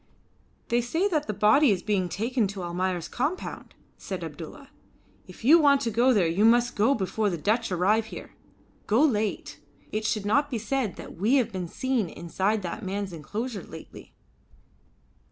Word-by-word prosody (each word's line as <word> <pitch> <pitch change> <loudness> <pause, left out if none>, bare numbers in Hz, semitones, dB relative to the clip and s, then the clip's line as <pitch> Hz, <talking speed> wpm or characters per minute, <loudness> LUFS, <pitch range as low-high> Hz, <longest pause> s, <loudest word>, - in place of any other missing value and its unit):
"They 240 +1 +2
say 320 +12 0
that 305 -5 -1
the - - 0
body 215 +8 +5
is 195 -4 +1
being 195 -4 0
taken 225 +5 0
to 195 -1 -6
Almayer's 175 0 -2
compound," 295 +9 -4 0.2
said - - -5
Abdulla. - - -9 0.6
"If - - -12
you 320 +6 +8
want 285 -3 +5
to 230 - -1
go 240 +4 +3
there 205 -8 +3
you 170 +5 +1
must 240 +2 +4
go 225 +7 +3
before 210 +1 -1
the 175 - -3
Dutch 215 +7 0
arrive 205 +5 +2
here. - - -9 0.6
Go 225 +7 +4
late. 215 -8 -1 0.3
It 215 +1 -2
should 215 -1 -1
not 285 +8 +2
be 245 - -2
said 225 -2 -2
that - - -10
we 215 +9 +2
have 240 -5 +2
been 185 -3 -4
seen 250 -1 -1
inside 195 +6 -2
that 175 - -5
man's 195 -1 -4
enclosure 210 - -5
lately." 160 -1 -12
215 Hz, 170 wpm, -26 LUFS, 190-245 Hz, 0.6 s, you